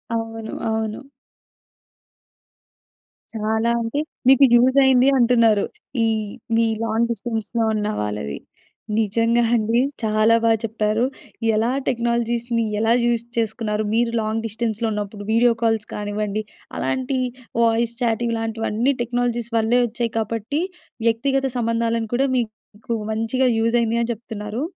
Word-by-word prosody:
అవును, 225 -1 -4 0.2
అవును. 220 +4 -3 2.3
చాలా 220 +1 0
అంటే, 230 +5 -2 0.3
మీకు 270 +1 +7
యూజయిందీ 260 +1 +5
అంటున్నారు. 230 -4 +4 0.4
ఈ - - +3 0.5
మీ 230 - +4 0.2
లాంగ్ 230 +1 +1
డిస్టెన్స్‌లో 225 0 -2
ఉన్న 210 -1 -1
వాళ్ళవి. 105 -10 -3 0.6
నిజంగా 230 +3 +2
అండి 225 +1 +2 0.2
చాలా 215 +1 +3
బా 230 - +4
చెప్పారు. 215 0 0 0.5
ఎలా 225 +3 +1 0.2
టెక్నాలజీస్‌ని 235 -1 0 0.2
ఎలా 225 +1 +3
యూజ్ 235 -1 +1
చేసుకున్నారు. 215 -1 -1
మీరు 230 +1 +2
లాంగ్ 220 +1 -2
డిస్టెన్స్‌లో 225 0 -2
ఉన్నప్పుడు 205 0 -4
వీడియో 235 +2 +4
కాల్స్ 225 -1 +1
కానివ్వండి, 210 0 -2 0.3
అలాంటి 260 +1 -1 0.5
వాయిస్ 230 +1 +1
చాట్ 235 -1 +1
ఇలాంటివన్నీ 225 +2 0
టెక్నాలజీస్ 240 -1 -1
వల్లే 225 +2 +3
వచ్చాయి. 235 0 -3
కాబట్టి 225 +7 -2 0.5
వ్యక్తిగత 270 +4 +1
సంబంధాలను 230 -1 0
కూడా 270 +3 +2
మీకు 220 -1 -5 0.2
మంచిగా 225 +4 +1
యూజయింది 230 0 +2
అని 235 - -1
చెప్తున్నారు. 220 +2 -6
230 Hz, 110 wpm, -22 LUFS, 220-235 Hz, 2.3 s, మీకు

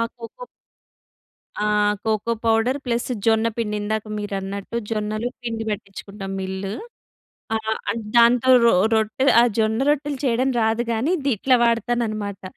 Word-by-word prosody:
Cocoa 235 - -10 1.2
ఆహ్, 210 0 +2
cocoa 220 +1 0
powder, 225 +4 +2
plus 240 +1 -1 0.2
జొన్నపిండి, 225 -1 +1
ఇందాక 215 +1 -2
మీరన్నట్టు 200 0 -5 0.2
జొన్నలు 215 +1 -2 0.2
పిండి 225 -2 -3
పట్టించుకుంటాం 200 -1 -6
మిల్లు. 190 +1 -4 0.8
ఆహ్, 220 0 -2 0.2
అంట్ 225 0 -6
దాంతో 235 +2 +5
రొ 235 - +5 0.2
రొట్టె, 220 +4 0
ఆ - - +6 0.2
జొన్నరొట్టెలు 270 +6 +1
చేయడం 255 +1 +1
రాదు 225 +1 +1
గానీ, 250 +11 0
ది 280 - +2
ఇట్లా 255 +4 +3
వాడతానన్నమాట. 230 -4 -1
225 Hz, 120 wpm, -22 LUFS, 210-235 Hz, 1.2 s, ఆ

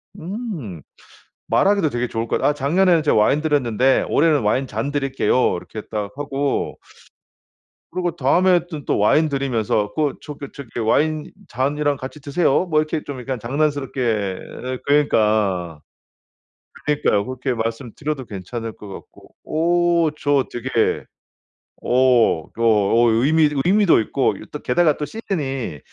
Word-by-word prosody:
음. 170 - -6 0.7
말하기도 200 -5 +2
되게 120 -1 -2
좋을 115 +1 -3
것 - - 0
같 - - +1
아 - - +3
"작년에는 165 +4 +3
제가 150 - +3
와인 110 +8 +3
드렸는데 135 -4 +2
올해는 150 -4 +3
와인 130 +6 +1
잔 115 +5 -3
드릴게요." 135 -6 +1
이렇게 110 +4 -8
딱 105 -2 -3
하고 140 -1 -2 1.1
그러고 175 -2 -2
다음에는 175 -3 +2
또 - - +1
와인 150 +10 +3
드리면서 115 -7 -1
그 150 -3 0
저기 145 -2 -8
저기 135 -4 -9
"와인 150 +7 +1 0.2
잔이랑 145 +3 0
같이 130 +3 -8
드세요." 145 +4 +1
뭐 155 -3 +1
이렇게 155 0 -2
좀 140 -3 -7
약간 130 0 -4
장난스럽게 125 -7 -1 0.3
어 130 - -4
그니까. 105 - +1 1.1
그러니까요 125 -9 +1
그렇게 130 0 -3
말씀드려도 120 +5 -4
괜찮을 110 +4 -6
것 105 - -12
같고. - - -13
오 175 +2 +1 0.3
저 145 -2 +1
되게 120 -1 0 0.8
어 125 -9 +3
그 - - -11
어 115 +1 +4
의미 150 +8 +3 0.2
의미도 195 - +4
있고 110 - 0
이 - - -12
또 - - -4
게다가 155 +3 +2
또 150 - -2
시즌이 135 - -4
135 Hz, 295 characters per minute, -21 LUFS, 115-155 Hz, 1.1 s, 어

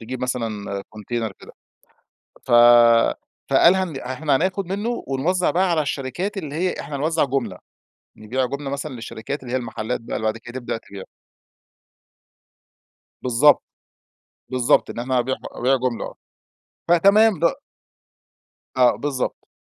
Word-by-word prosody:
تجيب 125 +3 -6
مثلًا 110 -6 -3
كونتينر 110 0 -4
كده. - - -14 0.9
ف - - -9 1.0
فقال 175 - +6
هن 185 -6 -2
إحنا 135 +3 -1
هناخد 185 +5 -1
منه 210 +6 -3
ونوزع 170 +7 0
بقى 185 +1 +1
على 160 -2 +2
الشركات 150 +9 -3
اللي 150 -7 -5
هي 180 +3 0
إحنا 145 - -6
هنوزع 155 +3 +1
جُملة، 125 -9 -2 0.6
نبيع 125 +5 -2
جُملة 140 +2 -5
مثلًا 140 0 -4
للشركات 120 +4 -6
اللي 125 - -7
هي - - +1
المحلات 115 -1 -3
بقى 115 - -5
اللي 110 - -4
بعد 110 +1 -1
كده 120 +3 -8
تبدأ 120 - -3
تبيعه. 100 -3 -11 2.2
بالضبط، 130 +4 +4 0.9
بالضبط، 130 +2 +2
إن - - -7
إحنا 125 +2 0
هنبيع 130 +2 0
ح - - -23
أبيع 130 +3 +1
جملة، 125 -2 -2
آه. - - -7 0.8
فتمام 200 +3 +5
د - - -5 1.3
آه، 125 -3 +5
بالضبط، 130 +3 -3
130 Hz, 140 wpm, -22 LUFS, 120-160 Hz, 2.2 s, فقال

